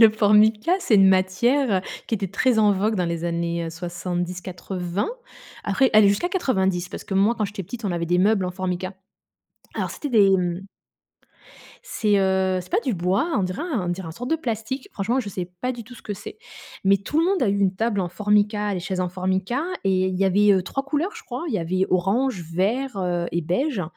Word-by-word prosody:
Le 225 - +10
Formica, 215 - +4
c'est 305 -12 +2
une 195 -1 +7
matière, 190 +8 +2
heu, - - -3 0.3
qui - - +1
était 195 -2 -3
très 240 +3 +2
en 210 -1 +5
vogue 210 +3 0
dans 180 - +1
les 170 -1 -3
années, 170 0 -1
heu, - - -5
70-80. 180 - -4 0.5
Après, 250 +7 +2
allez, 215 -2 +7
jusqu'à 200 +13 +1
90. 190 - 0
Parce - - -8
que, 195 - -5
moi, 200 +5 +3
quand 215 - 0
j'étais 200 -1 -5
petite, 225 +6 -8
on 195 - 0
avait 170 -1 -2
des 175 +1 +2
meubles 195 0 +3
en 180 - -2
Formica. 185 0 -3 0.8
Alors, - - -2
c'était 290 - -5
des, 210 -5 +5
mmh 180 +1 -2 1.2
c'est, 210 - +1
heu, 190 -1 +1
c'est 180 - -16
pas - - +2
du 250 -3 -1
bois, 185 - 0
on 200 - +1
dirait 185 0 -3
un 265 - -2
on - - -2
dirait 175 0 -3
un 160 - -6
sorte 245 +9 -6
de 325 - +3
plastique. 245 -2 -4
Franchement, 225 +5 -1
je 235 -6 -2
sais 180 -2 -4
pas 255 - -1
du 240 -2 -8
tout 245 +3 -13
ce - - -15
que 205 - -4
c'est 430 - -10 0.5
mais 195 +1 +5
tout 200 +10 -3
le 330 - +4
monde 380 +1 +1
a 235 - +2
eu 200 0 +1
une 195 -1 +2
table 220 +1 -1
en 180 - -1
Formica, 210 +2 +1
les 190 - -2
chaises 185 +1 -3
en 180 - 0
Formica, 190 - -1 0.2
et 190 -1 +2
il 185 - -2
y 195 - +3
avait, 205 +2 +4
heu, 190 -2 +2
3 275 +9 -4
couleurs, 305 +9 -1
je 455 - -11
crois. 250 +6 -5
Il 260 - -2
y - - +1
avait 185 +3 0
orange, 195 +5 +1
vert, 200 +10 -1
heu, 175 -2 -1
et 170 - 0
beige, 200 - -1
195 Hz, 230 wpm, -23 LUFS, 185-230 Hz, 1.2 s, Le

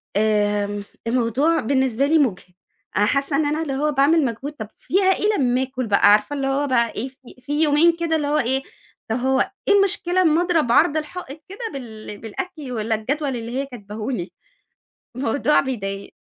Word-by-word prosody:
آآ، 205 -1 +1 0.2
الموضوع 255 +7 +2
بالنسبة 265 0 +1
لي 320 +2 +3
مُجهِد 190 - -1 0.4
حاسة 275 +8 +1
إن 310 - +2
أنا 300 +2 0
اللي 280 -4 -3
هو 300 +2 0
باعمل 290 +3 +3
مجهود 260 +4 -4
طب 220 -7 -7
فيها 390 +2 0
إيه 420 +2 +1
لما 255 -1 +2
آكل 255 -2 -4
بقى! 200 0 +4
عارفة 210 +7 +3
اللي 275 -1 -1
هو 280 +2 0
بقى 235 -3 +2
إيه 235 - -3
في 265 -1 -18
في 290 +4 -2
يومين 320 +3 +4
كده 335 -1 0
اللي 300 -2 -1
هو 295 +1 +1
إيه، 265 +2 0 0.5
طب 220 - 0
هو 265 +8 +1 0.2
إيه 410 - +5
المشكلة 370 -2 +2
أما 325 -1 +3
أضرب 335 -8 +1
عرض 310 +4 +4
الحائط 310 -1 -6
كده 395 - -10
بال 220 -5 -8
بالأكل 295 - -6
والّا 225 -1 -1
الجدول 270 +5 -2
اللي 230 0 -6
هي 275 - -1
كاتباه 215 -4 -8
لي؟ 185 -7 -4 0.8
الموضوع 280 +4 +2
بيضايق. 200 -7 -4
270 Hz, 180 wpm, -22 LUFS, 225-300 Hz, 0.8 s, إيه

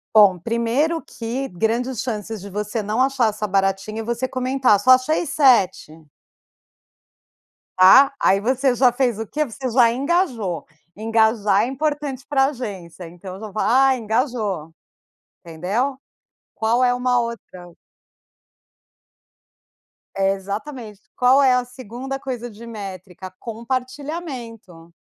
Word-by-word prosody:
Bom, 200 -4 +7
1º 235 - 0
que 245 +4 -5
grandes 230 +6 -1
chances 220 -3 -4
de 200 - -9
você 210 +2 -3
não 215 +5 -1
achar 265 -4 +2
essa 210 0 -4
baratinha 195 +2 -1
e - - -6
você 235 +3 -2
comentar: 255 -4 +2
"Só 255 +6 +4
achei 255 +7 +3
7". 195 - +2 1.7
Tá, 270 +10 +7
aí 195 - +4
você 255 +4 +1
já 250 0 +4
fez 245 -3 0
o 225 - -3
quê? 300 +8 -1
Você 255 +1 -5
já 235 -1 +4
engajou. 255 - -1 0.3
Engajar 220 -1 +2
é - - -1
importante 285 -1 -3
pra 270 -2 +3
agência, 195 - -6
então 180 +2 -10
eu - - -11
já 215 -2 -7
falo: 215 - -2
"Ah, 265 +1 +5
engajou", 220 - -2 0.7
entendeu? 200 - -2 0.6
Qual 230 +3 +1
é 245 - +4
uma 250 0 +1
outra 185 -7 -7 2.4
É 195 0 +2
exatamente. 210 +2 -7
Qual 255 +3 +4
é 260 -2 +5
a 250 0 +1
2ª 255 +2 -7
coisa 245 -3 -5
de 230 +1 -12
métrica: 190 -4 -8
compartilhamento. 240 - -6
230 Hz, 125 wpm, -21 LUFS, 200-260 Hz, 2.4 s, Bom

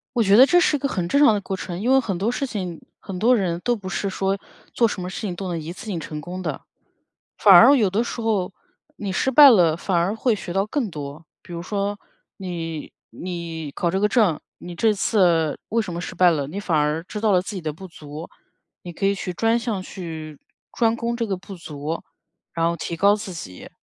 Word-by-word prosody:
我 235 - +3
觉 200 -1 +5
得 255 - +10
这 355 - +4
是 305 - +3
一 - - -4
个 280 - 0
很 180 -9 -2
正 280 - +2
常 225 - +6
的 205 - -1
过 190 -1 -4
程， 180 -1 -6
因 240 - 0
为 265 - +6
很 200 -7 -3
多 215 +5 0
事 275 - -2
情 185 -9 -5 0.2
很 190 -2 -7
多 240 +4 +4
人 175 -4 -1
都 240 -1 +1
不 195 -3 -8
是 200 +1 -2
说 195 +1 -1 0.4
做 230 - +3
什 195 - -5
么 180 - -4
事 - - -6
情 200 -5 -3
都 190 -1 -5
能 170 - -2
一 160 +2 -6
次 200 - -11
性 185 -6 -3
成 155 -1 -6
功 180 +4 -7
的。 - - -4 0.8
反 200 -3 +7
而 245 +11 +9
有 210 -7 +2
的 205 +5 +1
时 240 - -5
候， 210 -5 0 0.4
你 200 -2 -4
失 265 - +1
败 285 +1 +9
了 170 -8 +4
反 180 +1 -1
而 175 +4 +1
会 230 +1 +1
学 190 -4 -6
到 195 +2 +1
更 235 -2 -2
多。 150 0 -8 0.2
比 - - -12
如 170 0 -5
说 205 +1 -2 0.4
你 165 -5 -6 0.2
你 170 -4 -6
考 170 - -1
这 190 - 0
个 210 - +3
证， 210 - +2 0.2
你 175 0 -9
这 220 +4 +2
次 175 -6 +2
为 230 +1 +1
什 185 -5 -6
么 170 - -4
失 - - -6
败 180 -1 +5
了， 145 -4 -1
你 165 +8 -6
反 175 -5 0
而 150 +2 0
知 210 - -6
道 215 -1 +2
了 180 -1 +3
自 205 - -7
己 190 - -4
的 155 -2 -3
不 190 +6 -10
足， 155 0 -9 0.5
你 175 - -8
可 195 - -5
以 200 - +2
去 185 -2 -4
专 225 +6 +1
项 230 -5 -3
去 160 -6 -8 0.3
专 230 -2 +2
攻 235 0 -2
这 230 -1 -1
个 195 - -2
不 195 +2 -10
足， 155 -1 -5 0.5
然 165 0 +1
后 170 - -2
提 170 - -5
高 200 +4 +5
自 210 -2 -6
己。 90 - -9
190 Hz, 260 characters per minute, -23 LUFS, 170-215 Hz, 0.8 s, 得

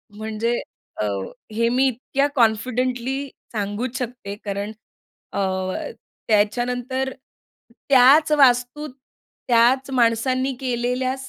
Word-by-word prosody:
म्हणजे 220 +2 -2 0.4
अ, - - +1 0.5
हे 230 +2 +1
मी 255 +3 +2
इतक्या 265 +3 0
कॉन्फिडेंटली 250 +3 0 0.2
सांगूच 220 +4 -3
शकते 245 -5 -5
कारण 200 +1 -3 0.6
अ, - - -3 0.9
त्याच्यानंतर 245 +5 0 0.8
त्याच 280 +4 +6
वास्तूत 270 +1 +3 0.6
त्याच 250 +3 +4
माणसांनी 255 +2 +1
केलेल्या 250 0 -1
245 Hz, 85 wpm, -22 LUFS, 230-260 Hz, 0.9 s, त्याच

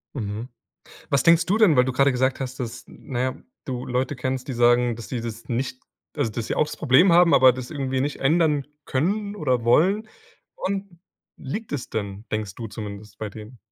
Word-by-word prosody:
Mhm. 110 0 -4 0.6
Was 140 - +2
denkst 165 0 +5
du 195 +6 +2
denn, 210 -9 +5
weil 125 -1 +5
du 130 - -1
gerade 140 +2 +3
gesagt 130 +1 0
hast, 130 -1 -5
dass 120 -1 -6
n - - -15
naja, 130 +1 -2 0.2
du 125 -2 -4
Leute 130 +3 -1
kennst, 130 0 -3
die 135 - -3
sagen, 120 0 +3
dass 115 -1 -9
die 125 -3 -3
das 115 0 -7
nicht 125 +1 -2 0.3
also, - - 0
dass 110 +1 -4
sie - - -2
auch - - +3
das 150 0 -7
Problem 155 +6 +5
haben, 175 -1 +6
aber 130 -2 +7
das 125 0 -7
irgendwie 135 -3 -1
nicht 145 +1 -2
ändern 150 -1 +2 0.2
können 200 +9 -1
oder 130 - 0
wollen 190 - +3 0.5
woran 195 -2 -4 0.4
liegt 210 +12 -6
es 145 - -4
denn, 100 0 -4
denkst 105 -2 -3
du 115 - -6
zumindest 105 -1 -8
bei 110 - -4
denen? 110 +4 -11
130 Hz, 200 wpm, -24 LUFS, 120-150 Hz, 0.6 s, aber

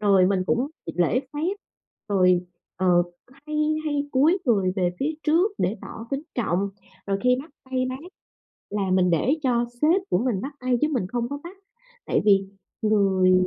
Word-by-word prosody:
rồi 195 -3 +5
mình 190 -1 +1
cũng 250 +8 +1 0.2
gi 165 - -4
lễ 180 +9 +2
phép, 330 +6 -1 0.5
rồi, 185 -3 +3 0.3
ờ, 180 -2 +4 0.4
hay 300 0 -3 0.3
hay 290 -1 -1
cúi 305 +8 +4
người 195 -6 +3
về 180 -2 +2
phía 305 +3 0
trước 340 +7 +3
để 210 - 0
tỏ 225 +1 -8
kính 275 +1 -2
trọng, 200 -4 0 0.4
rồi 195 0 0
khi 250 0 +5
bắt 320 - -16 0.2
tay 255 -1 0
bác 255 - -4 0.7
là 200 -2 -1
mình 185 -1 +3
để 170 - +2
cho 240 -2 +2 0.2
sếp 330 +6 +4
của - - +3
mình 230 -3 0
bắt 280 +2 -5
tay 255 -1 +1
chứ 300 - +4
mình 230 -9 0
không 240 +2 -2
có 285 - -3
bắt. 360 +3 -9 0.5
Tại - - +1
vì 195 -2 +4 0.4
người 195 -4 +3
230 Hz, 185 wpm, -24 LUFS, 190-280 Hz, 0.7 s, rồi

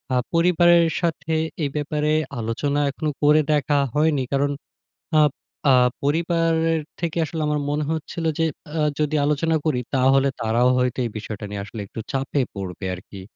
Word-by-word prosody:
আ - - +3 0.2
পরিবারের 170 0 +5 0.2
সাথে 165 -1 -1 0.3
এই 145 - 0
ব্যাপারে 150 0 -1 0.3
আলোচনা 130 +6 -1
এখনো 155 +2 -3
করে 150 +1 +6
দেখা 145 0 +1 0.2
হয়নি। 150 -3 +2
কারণ 140 +1 +2 0.7
আব 150 - +4 0.4
আ - - +7 0.3
পরিবারের 165 +1 +1 0.2
থেকে 170 -1 -2
আসলে 160 +1 -4
আমার 150 0 0
মনে 150 +1 0
হচ্ছিল 160 +1 -4
যে 165 - +3 0.3
আ - - +2 0.2
যদি 150 0 0
আলোচনা 150 +2 +1
করি 150 -6 +1 0.2
তাহলে 135 +1 +4
তারাও 115 +2 +3
হয়তো 125 0 0
এই 115 - -2
বিষয়টা 105 0 -6
নিয়ে 100 -1 -4
আসলে 110 +2 -9
একটু 115 - -8
চাপে 135 +1 0
পড়বে 95 -1 -6
আরকি। 95 +2 -11
150 Hz, 155 wpm, -23 LUFS, 125-160 Hz, 0.7 s, আ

